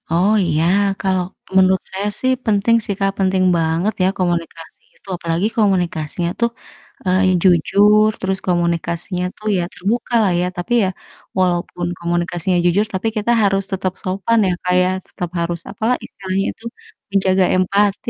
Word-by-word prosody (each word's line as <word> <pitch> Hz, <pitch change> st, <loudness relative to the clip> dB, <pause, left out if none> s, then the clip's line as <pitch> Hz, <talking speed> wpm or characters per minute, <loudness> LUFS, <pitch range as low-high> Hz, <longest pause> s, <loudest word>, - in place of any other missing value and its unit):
Oh 180 Hz, +6 st, +3 dB
iya, 160 Hz, -1 st, +1 dB, 0.4 s
kalau 190 Hz, -2 st, +1 dB, 0.3 s
menurut 190 Hz, 0 st, +4 dB
saya 195 Hz, +2 st, -3 dB
sih 260 Hz, -, +1 dB
penting 215 Hz, +2 st, +3 dB
sih, 200 Hz, -, -1 dB
Kak, 195 Hz, 0 st, +1 dB
penting 190 Hz, -1 st, +2 dB
banget 165 Hz, +6 st, 0 dB
ya -, -, +4 dB
komunikasi 170 Hz, -2 st, -3 dB, 0.2 s
itu, -, -, -29 dB
apalagi 170 Hz, +3 st, -1 dB
komunikasinya 175 Hz, -5 st, 0 dB
tuh, 235 Hz, 0 st, +2 dB, 0.6 s
eee, 185 Hz, +1 st, +2 dB, 0.2 s
jujur 205 Hz, +4 st, +4 dB
terus 190 Hz, 0 st, -2 dB
komunikasinya 175 Hz, +1 st, -1 dB
tuh 215 Hz, -, -8 dB
ya 175 Hz, -, 0 dB
terbuka 220 Hz, +7 st, -2 dB
lah 195 Hz, -, +2 dB
ya 180 Hz, -, 0 dB
tapi 175 Hz, +7 st, -3 dB
ya, 190 Hz, -, +1 dB, 0.5 s
walaupun 175 Hz, -1 st, 0 dB
komunikasinya 175 Hz, +1 st, -1 dB
jujur 185 Hz, +5 st, +3 dB
tapi 190 Hz, +4 st, -1 dB
kita 215 Hz, +3 st, +1 dB
harus 195 Hz, -1 st, +2 dB
tetap 185 Hz, -1 st, -2 dB
sopan 195 Hz, +5 st, 0 dB
ya, -, -, +1 dB
Kak, 180 Hz, -, +1 dB
ya 180 Hz, -, +2 dB, 0.2 s
tetap 175 Hz, -, -5 dB
harus 170 Hz, 0 st, -2 dB
apa 220 Hz, -, -5 dB, 0.2 s
istilahnya 190 Hz, -1 st, -3 dB
itu, -, -, -23 dB, 0.5 s
menjaga 190 Hz, -1 st, +3 dB
empati 200 Hz, +2 st, +1 dB
185 Hz, 155 wpm, -19 LUFS, 175-200 Hz, 0.6 s, menurut